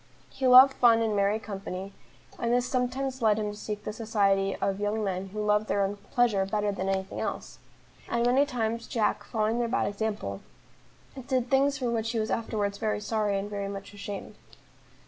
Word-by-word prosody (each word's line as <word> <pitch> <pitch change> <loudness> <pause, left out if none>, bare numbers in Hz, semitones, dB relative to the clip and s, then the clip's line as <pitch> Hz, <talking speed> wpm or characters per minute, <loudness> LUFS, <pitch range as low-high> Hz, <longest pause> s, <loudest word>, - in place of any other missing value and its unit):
He 265 -1 -1
loved 260 +2 +9
fun 235 -3 +5
and 220 -2 0
merry 200 +1 +2
company, 195 -2 -6 0.5
and 235 - 0
this 245 +1 +2
sometimes 255 +1 -2
led 215 -2 +4
him 210 -1 -2
to - - -9
seek 210 0 -6
the 210 - -4
society 200 -3 +1
of 195 0 -1
young 210 +1 -1
men 190 -1 -2
who 210 +2 -4
loved 210 +1 +2
their 200 - +1
own 200 +1 -2
pleasure 235 -6 +2
better 205 +1 -1
than 195 -1 -3
any 190 0 0
thing 190 - -8
else; - - -5 0.5
and 235 0 +1
many 265 +4 +4
times 230 -3 -2
Jack, 210 -2 0
following 220 +2 -1
their 240 - +1
bad 240 - 0
example, 205 - -3 0.9
did 255 -2 0
things 275 +1 +3
for 250 -4 -1
which 225 0 -1
he - - -1
was 215 0 -2
afterwards 205 -3 -2
very 215 -2 -1
sorry 210 -1 0
and 195 +1 -3
very 200 -1 -4
much 200 0 -7
ashamed. 205 0 -7
215 Hz, 195 wpm, -28 LUFS, 200-235 Hz, 0.9 s, loved